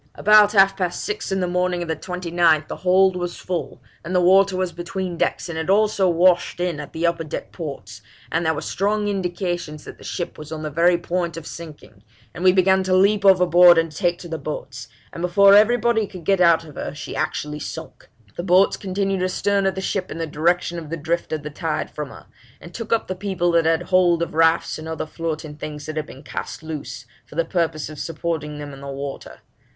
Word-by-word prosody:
'About 210 0 +6
half 195 -1 +5
past 180 -2 -2
six 420 - -4
in 190 0 0
the 180 - 0
morning 180 0 0
of - - -7
the 160 - -1
29th 170 -2 +1
the - - -6
hold 185 +1 +3
was 175 -1 -4
full, 180 -2 -5 0.2
and 175 +3 -4
the - - +5
water 190 +1 +4
was 185 -1 -1
between 175 +1 -5
decks, 170 - -1
and 165 -2 -4
it 160 - -4
also 205 -1 +3
washed 175 +1 +3
in 175 -4 -1
at 150 - -8
the 165 +1 -2
upper 170 -1 0
deck 155 - -6
ports, 135 - -8 0.3
and 165 +1 0
there 160 -1 +2
were - - -4
strong 205 +2 -1
indications 175 -5 -3
that - - -11
the - - -13
ship 175 - -5
was 150 0 -10
on 155 -1 -5
the 155 - -4
very 170 +3 +3
point 170 -1 -3
of 165 - -8
sinking, 155 -13 -11 0.3
and 175 - -7
we 185 - +7
began 190 +1 +3
to 185 0 +1
leap 200 +2 +3
overboard 180 -2 +7
and 165 -1 +1
take 175 +1 0
to 175 - -10
the 165 -1 -5
boats, 150 +2 -6 0.3
and 170 - -7
before 195 +3 +5
everybody 220 +1 +4
could 180 -3 -11
get 195 -2 +2
out 170 -2 +5
of 155 -2 -12
her - - -6
she 150 - -7
actually 150 0 -3
sunk. - - -8 0.3
The - - -3
boats 185 +2 +3
continued 195 0 -2
astern 195 +2 +1
of 190 - -1
the 190 - -3
ship 190 -1 -2
in - - -6
the 165 - -2
direction 170 +3 0
of 160 -3 -10
the 165 - -3
drift 170 +3 -2
of 155 -2 -3
the 150 - -6
tide 160 +1 -3
from 150 -2 -5
her, - - -13 0.3
and 170 - -12
took 230 -1 -7
up 230 - +2
the 185 - -2
people 185 -2 -1
that 165 -1 +3
had 165 +1 +2
hold 175 -2 +3
of 170 - -5
rafts 165 0 +2
and 155 - -8
other 160 0 -4
floating 155 -2 -5
things 150 -1 -7
that 155 - -6
had 155 -2 -3
been 135 - -12
cast 140 - -6
loose, 155 -2 -7 0.2
for - - -16
the 165 +1 +1
purpose 165 -3 -1
of 155 -1 -9
supporting 155 -2 -4
them 145 -1 -7
on 135 - -11
the 140 - -8
water. 140 0 -7
175 Hz, 230 wpm, -22 LUFS, 160-185 Hz, 0.3 s, we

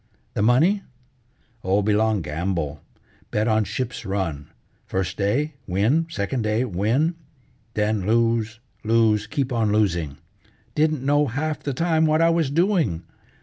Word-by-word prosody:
"The - - -1
money? 155 - +4 0.8
Oh, 95 +2 +2
belong 105 -1 +2
gamble. 80 -2 -3 0.5
Bet 105 +1 0
on 110 -1 +2
ship's 125 +2 -4
run. 90 -7 -3 0.4
First 95 0 -2
day 125 +11 0
win. 110 - +2
Second 120 -1 -2
day 110 +3 +1
win. 120 - +1 0.6
Then 105 -1 0
lose, 115 -1 +1 0.2
lose, 110 -1 +2
keep 140 -3 -2
on 110 -3 +1
losing. 85 -9 0 0.6
Didn't 155 -3 +1
know 145 +1 +3
half 150 +5 -2
the 140 -3 -3
time 160 0 +2
what 155 +1 +3
I 165 0 +4
was 165 -4 +1
doing. 160 - +1
110 Hz, 135 wpm, -23 LUFS, 100-145 Hz, 0.8 s, money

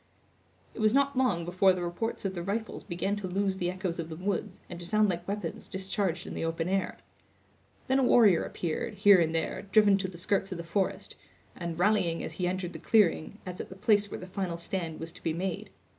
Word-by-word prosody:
It - - -10
was 215 +2 +3
not 280 0 +3
long 240 -10 +1
before 185 +2 +4
the 180 -1 -3
reports 185 +6 -3
of 190 - -1
the 175 - -4
rifles 210 +5 -3
began 195 +2 -2
to 200 -2 -4
lose 195 +1 0
the 175 -1 -1
echoes 185 -2 -3
of 165 -1 -4
the 160 - -6
woods, 190 +2 -3
and 175 - -8
to 175 - -8
sound 215 +1 +3
like 175 -1 -3
weapons 205 +1 -4
discharged 190 -2 -2
in - - -6
the - - -3
open 165 0 -1
air. 195 +1 -1 0.9
Then 265 +1 +3
a - - +3
warrior 215 -8 +5
appeared, 175 +6 -3
here 200 -1 +7
and 165 -1 +1
there, 165 - -1
driven 205 -2 +5
to 190 - -1
the 180 -2 -9
skirts 195 +3 0
of 185 - -3
the 170 - -5
forest, 190 +4 -2 0.4
and 170 -2 -5
rallying 180 -3 +2
as 160 - -5
he 180 +2 -1
entered 180 -1 -3
the - - -7
clearing, 205 -3 +2
as 180 0 -5
at - - -9
the 185 - -9
place 205 0 +2
where - - -6
the - - -7
final 185 -2 -3
stand 170 -2 -4
was 165 0 -5
to 180 - -15
be 165 - -1
made. 180 +2 -3
185 Hz, 230 wpm, -29 LUFS, 170-205 Hz, 0.9 s, here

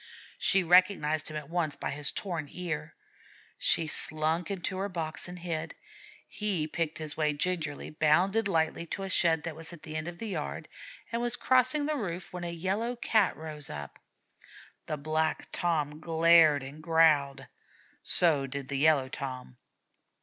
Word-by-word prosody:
She 195 -1 +3
recognized 170 -3 +3
him 155 - -5
at 150 -2 -7
once 165 -3 -1
by - - -4
his 145 0 0
torn 170 -6 -4
ear. 165 -3 -5 0.6
She 165 - +2
slunk 155 +2 +4
into 190 -1 -3
her 200 +1 -2
box 165 -3 -3
and 180 0 -8
hid. 165 -2 -4 0.5
He 200 -7 -1
picked 165 0 -2
his 155 -1 -3
way 150 -1 +1
gingerly, 155 -1 -2
bounded 180 +8 +2
lightly 165 -1 0
to 195 - -5
a 195 - -4
shed 165 -4 +2
that 165 -3 -5
was 165 +2 -9
at 170 -3 -12
the 155 - -7
end 155 +1 -3
of 175 0 -6
the 225 +2 -5
yard, - - -4 0.4
and 235 0 -1
was 240 0 0
crossing 260 +4 +2
the 305 0 -1
roof 180 -7 -5
when 180 -1 -5
a 170 - -3
Yellow 195 +8 -2
Cat 220 -4 +1
rose 155 -2 -7
up. 75 -1 -8 0.9
The 155 - -2
Black 155 +2 -1
Torn 155 -3 -1
glared 165 -3 +5
and 140 +3 -10
growled, 155 -4 +3 0.6
so 150 -6 +2
did 135 0 -6
the 140 -1 -2
Yellow 145 -3 +4
Tom. 130 - -7
160 Hz, 165 wpm, -29 LUFS, 150-180 Hz, 0.9 s, glared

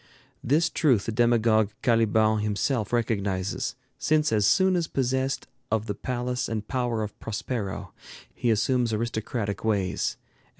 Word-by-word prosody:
This 155 +6 +3
truth 130 -11 +2
the - - -2
demagogue 115 -2 +3
Caliban 110 -2 +3
himself 105 +2 -1
recognizes, 100 -5 -1 0.2
since 155 -1 +2
as 105 -2 +3
soon 190 - +4
as 170 -2 0
possessed 130 +1 -1 0.2
of 110 -1 0
the 105 - -2
palace 125 +3 -3
and 110 -2 -3
power 120 -4 -1
of 105 - -7
Prospero, 105 -2 -4 0.4
he 120 - -1
assumes 115 +1 +2
aristocratic 110 -1 -2
ways; 100 -4 0
and - - -38
M. - - -34
115 Hz, 140 wpm, -26 LUFS, 105-125 Hz, 0.4 s, soon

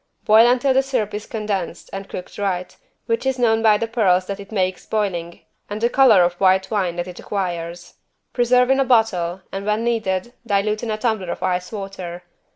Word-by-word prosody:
Boil 220 +2 +6
until 255 +2 +2
the 265 - +4
syrup 250 -6 -2
is 210 +1 -5
condensed 205 -6 -4
and 195 0 -6
cooked 180 - -8
right, 185 -3 -2 0.3
which 230 0 -1
is 265 -1 0
known 225 -2 +2
by 215 -2 +5
the 230 - -1
pearls 195 -6 +2
that 200 +1 -5
it 200 +1 -11
makes 185 -3 -1
boiling 175 -6 -2 0.3
and 205 +1 -4
the 235 +2 +1
color 235 -9 +6
of 175 0 +1
white 190 +1 +3
wine 190 -5 0
that 175 +1 -3
it 180 - -9
acquires. 175 -3 -4 0.4
Preserve 250 +1 +3
in 270 - +3
a - - +4
bottle, 200 -8 +1
and 195 0 -4
when 210 +2 0
needed, 225 -2 -1
dilute 210 -1 0
in 235 - -4
a 215 - -1
tumbler 215 -5 -1
of - - -4
ice 180 -1 -1
water. 190 -4 -7
205 Hz, 200 wpm, -21 LUFS, 185-230 Hz, 0.4 s, Boil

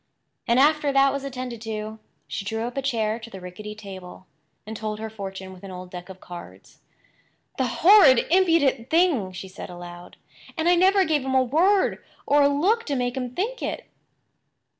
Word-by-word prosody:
And 235 +1 +3
after 295 0 +3
that 275 0 +4
was 280 -1 -4
attended 255 -4 -6
to, 220 -1 -5 0.3
she - - -4
drew 225 +2 -3
up 240 +1 -5
a 275 - -1
chair 225 -4 -1
to 230 0 -10
the 195 - -9
rickety 185 +4 -8
table, 190 -3 -10 0.4
and 220 +1 -7
told 215 0 -4
her 220 0 -5
fortune 190 -2 -7
with 185 - -15
an 195 - -8
old 180 0 -9
deck 180 0 -8
of 190 0 -10
cards. 95 - -12 0.8
"The 260 - +2 0.2
horrid, 360 - +8
impudent 330 -9 +3
thing!" 320 - +2
she 185 +1 -8
said 190 - -9
aloud. 175 0 -10 0.4
"And 320 +1 0
I 350 - +6
never 380 +2 +4
gave 305 -4 +1
him 265 0 -1
a 260 - +5
word 355 +10 +2 0.2
or 290 +1 +4
a 280 - +6
look 380 +12 +2
to 285 - -1
make 245 -1 -1
him 250 -2 -4
think 470 +7 -2
it!" - - -4
235 Hz, 190 wpm, -24 LUFS, 195-290 Hz, 0.8 s, horrid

